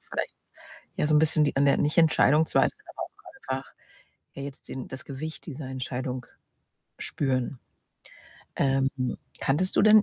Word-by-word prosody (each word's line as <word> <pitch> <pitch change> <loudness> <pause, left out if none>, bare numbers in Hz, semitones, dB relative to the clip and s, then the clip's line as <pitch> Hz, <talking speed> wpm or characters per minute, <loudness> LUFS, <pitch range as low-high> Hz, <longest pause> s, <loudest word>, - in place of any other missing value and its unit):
vielleicht - - -2 0.6
ja 150 - +2
so 155 - +4
'n - - +7
bisschen 155 0 +4
die 145 - -1
an 140 - +4
der, 140 - +5
nicht 150 +3 +1
Entscheidung 160 -1 +5
zweifeln, - - +2
aber - - -8
auch 130 - -7
einfach 135 - -11 0.6
ja 140 - -6
jetzt 140 -1 -8
den 130 -1 -6
das 130 0 -7
Gewicht 155 +3 -6
dieser 150 -2 -6
Entscheidung 130 -1 -4 0.8
spüren. 130 -2 -1 1.0
Ähm, 135 -1 +3 0.5
kanntest 170 +7 +1
du - - +6
denn 215 0 +8
140 Hz, 155 wpm, -27 LUFS, 130-155 Hz, 1.0 s, denn